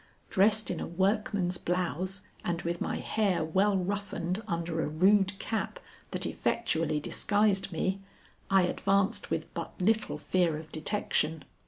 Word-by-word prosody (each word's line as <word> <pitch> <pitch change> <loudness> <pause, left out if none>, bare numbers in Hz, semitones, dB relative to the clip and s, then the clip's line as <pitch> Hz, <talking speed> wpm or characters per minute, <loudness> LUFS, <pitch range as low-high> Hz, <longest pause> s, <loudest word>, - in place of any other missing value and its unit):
Dressed 215 +3 +3
in 170 - -3
a - - -3
workman's 190 0 0
blouse 185 +2 -2 0.2
and 175 0 -2
with 170 0 -2
my - - -1
hair 200 -7 +1
well 195 +5 +3
roughened 195 0 -2
under 170 -1 -1
a - - -1
rude 190 +5 +3
cap 225 - -3 0.3
that - - -2
effectually 160 -9 0
disguised 205 +4 +1
me, 190 +4 -1 0.5
I 195 -1 +5
advanced 195 +2 +1
with - - -3
but - - -6
little 215 +3 +1
fear 175 -4 +1
of 155 0 -10
detection. 160 -2 -1
185 Hz, 140 wpm, -30 LUFS, 170-205 Hz, 0.5 s, I